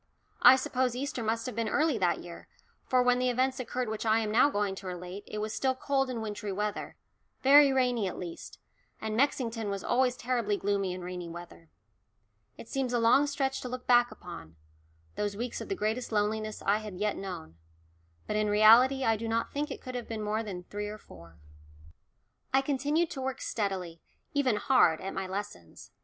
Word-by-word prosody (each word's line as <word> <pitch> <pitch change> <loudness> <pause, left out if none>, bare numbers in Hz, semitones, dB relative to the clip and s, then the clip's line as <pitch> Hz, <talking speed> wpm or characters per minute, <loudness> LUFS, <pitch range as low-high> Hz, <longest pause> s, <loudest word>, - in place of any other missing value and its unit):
I 260 - +9
suppose 255 -1 -1
Easter 265 -1 -3
must 225 +1 -1
have 255 - -4
been 230 -1 -1
early 295 -4 +1
that 180 -2 +1
year, 170 -1 -10 0.4
for 255 -1 +3
when 250 0 +3
the 255 0 +2
events 255 +2 0
occurred 250 0 -3
which 215 0 -4
I 220 0 +3
am 220 -2 -1
now 245 +6 +5
going 205 -6 -1
to 190 - -8
relate, 180 +2 -6
it 215 - -6
was 215 +1 -3
still 260 -1 0
cold 270 0 0
and 235 -3 -3
wintry 210 -1 -4
weather 210 +2 -3 0.5
very 280 +1 +7
rainy 250 -5 +1
at 185 - -5
least, 175 -2 -8 0.4
and 220 -1 -3
Mexington 230 -4 0
was 200 -1 -3
always 250 0 +2
terribly 235 -4 0
gloomy 200 -2 0
in 180 0 -6
rainy 180 -1 -6
weather. 165 - -11 0.9
It - - -10
seems 265 -2 -2
a 240 - +2
long 240 +6 +5
stretch 270 -2 -1
to 250 - -5
look 250 0 -6
back 240 -1 +5
upon 125 - -10 0.6
those 205 -1 -2
weeks 240 +1 -4
of - - -7
the 390 - -1
greatest 225 - -2
loneliness 215 0 -1
I 205 +2 +2
had 210 -3 -8
yet 210 +1 0
known 85 - -7 0.7
but 210 - -3
in 215 0 +1
reality 230 +6 +6
I 225 -2 +3
do 225 +1 -5
not 230 +1 -1
think 295 +2 -2
it - - -7
could 255 - -7
have 245 -2 -5
been 220 -2 -4
more 210 +1 -1
than 190 -5 -6
three 205 +3 -5
or 210 +1 -6
four. 85 - -15 1.1
I 265 +1 +4
continued 290 +4 0
to 270 - -5
work 265 0 -3
steadily 185 -6 -3 0.3
even 275 -6 +2
hard 210 -8 +4
at 195 - -5
my 190 -1 -3
lessons. 190 - -7
220 Hz, 200 wpm, -30 LUFS, 200-255 Hz, 1.1 s, I